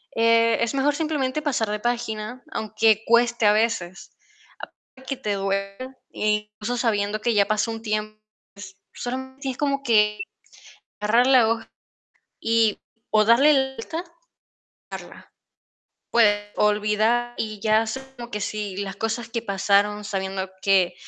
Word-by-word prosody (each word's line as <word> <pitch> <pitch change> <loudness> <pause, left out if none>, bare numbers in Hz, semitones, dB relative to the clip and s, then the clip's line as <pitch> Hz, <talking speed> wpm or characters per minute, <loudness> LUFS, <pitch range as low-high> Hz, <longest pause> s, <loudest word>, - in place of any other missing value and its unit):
eh, 230 0 +4
es 235 - 0
mejor 280 +1 +1
simplemente 305 -3 -1
pasar 260 -8 -1
de 210 0 -2
página, 240 0 -3
aunque 220 0 +1
cueste 235 -1 +3
a 205 - +7
veces, 215 -5 -1 0.8
aunque 265 0 -6
te 210 -5 -2
duela, 195 +6 -3 0.2
e 210 0 0
incluso 240 +4 -2
sabiendo 215 -3 0
que 235 +1 +1
ya 205 -2 +3
pasó 215 +2 0
un 225 0 -6
tiempo, 215 -1 -3 0.7
solamente 260 +2 -5
es 250 - -10
como 280 -1 -1
que 210 -4 +3 0.8
agarrar 230 +4 +3
la 255 -4 +5
hoja 230 0 -2 0.7
y 225 -1 +2 0.3
o 215 -1 +5
darle 260 +7 +6
la 265 -1 +2
vuelta, 320 +9 -5 0.9
dejarla. - - -10 0.8
Puedes 205 -3 +3
olvidar 215 +3 +1
y 215 -2 -4
ya 215 +1 +3
es 225 +3 -3 0.2
como 240 -1 -8
que 210 - -4
si 205 -2 -4
las 195 -1 -4
cosas 225 +1 -3
que 230 0 -3
pasaron 205 0 +1
sabiendo 190 -1 -3
que 190 -3 +3
225 Hz, 140 wpm, -24 LUFS, 210-240 Hz, 0.9 s, a